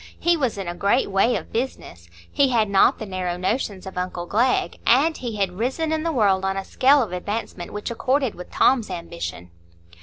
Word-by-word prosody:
He 345 0 +3
was 260 -9 -1
in 195 -2 -5
a 175 - -3
great 200 +5 +1
way 195 +5 +3
of - - -6
business; 155 - -4 0.2
he 280 - +3
had 220 -5 +1
not 195 - +4
the 220 - -6
narrow 185 -2 -3
notions 195 0 -2
of 190 -1 -5
uncle 180 -1 -4
Glegg; 235 +8 +1
and 290 +7 +4
he 235 -3 -5
had 195 -2 -2
risen 270 +7 -1
in 315 0 0
the 330 +1 -1
world 200 -8 +2
on 195 0 -1
a 195 - -4
scale 275 +1 +4
of 210 - -6
advancement 180 -1 -4
which 210 +2 -5
accorded 260 +2 0
with 180 - -10
Tom's 240 -6 +2
ambition. 170 - -6
210 Hz, 205 wpm, -23 LUFS, 185-255 Hz, 0.2 s, not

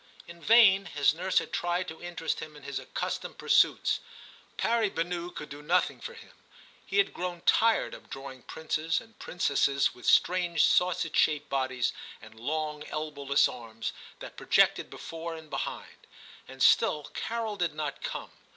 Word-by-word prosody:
In 170 0 -12
vain 205 -3 +6
his 145 -2 +2
nurse 185 +3 -1
had - - +1
tried 175 +1 -1
to 160 - -9
interest 175 -2 -3
him 155 -1 -8
in 150 - -14
his 140 -1 -4
accustomed - - -4
pursuits. - - +3 0.6
Pari 230 -3 +2
banou 175 0 -3
could 150 - -8
do 145 +1 -9
nothing 175 +5 +1
for 475 - -7
him; 455 - -14 0.5
he - - -3
had 400 - +3
grown 175 -1 -4
tired 225 +4 +3
of - - -12
drawing 135 -1 -8
princes 160 +2 -2
and 225 0 -18
princesses 140 -4 +1
with 125 - -10
strange 175 -3 +3
sausage 180 -3 +2
shaped 150 -2 +2
bodies 130 -2 0 0.3
and 110 - -15
long 150 +3 -3
elbowless 145 -2 +1
arms 115 -2 -6 0.3
that - - -9
projected - - +3
before 165 0 -7
and 160 -1 -12
behind; - - -6 0.4
and 135 0 -4
still 150 - +4
Carol 225 -2 -3
did 175 -5 -1
not 150 -2 -4
come. - - -5
160 Hz, 160 wpm, -29 LUFS, 145-180 Hz, 0.6 s, vain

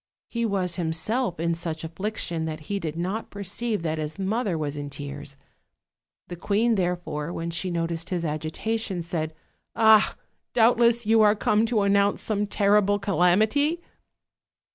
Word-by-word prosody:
He 235 -1 -1
was 185 -4 -1
himself 175 +4 -1
in 170 +1 +1
such 165 -1 -4
affliction 170 -1 -3
that 155 -1 -5
he 200 +6 -3
did 160 -3 -4
not 190 +6 -3
perceive 205 +1 -3
that 160 -1 -1
his 155 0 -4
mother 195 -1 -1
was 150 -2 -3
in 145 -1 -5
tears. 145 0 -7 0.9
The 175 - -6
queen, 210 +6 +1
therefore, 175 -5 -2
when 170 0 -4
she 175 +2 -2
noticed 170 -1 -2
his 175 -2 -2
agitation, 175 +6 -3
said: 160 -2 -3 0.4
"Ah! 220 -1 +5 0.4
doubtless 235 0 +4
you 220 +1 +5
are 210 0 +5
come 215 +1 +2
to 220 -3 +1
announce 200 0 +2
some 210 -1 -1
terrible 205 0 +3
calamity?" 210 - +2
185 Hz, 145 wpm, -25 LUFS, 165-215 Hz, 0.9 s, Ah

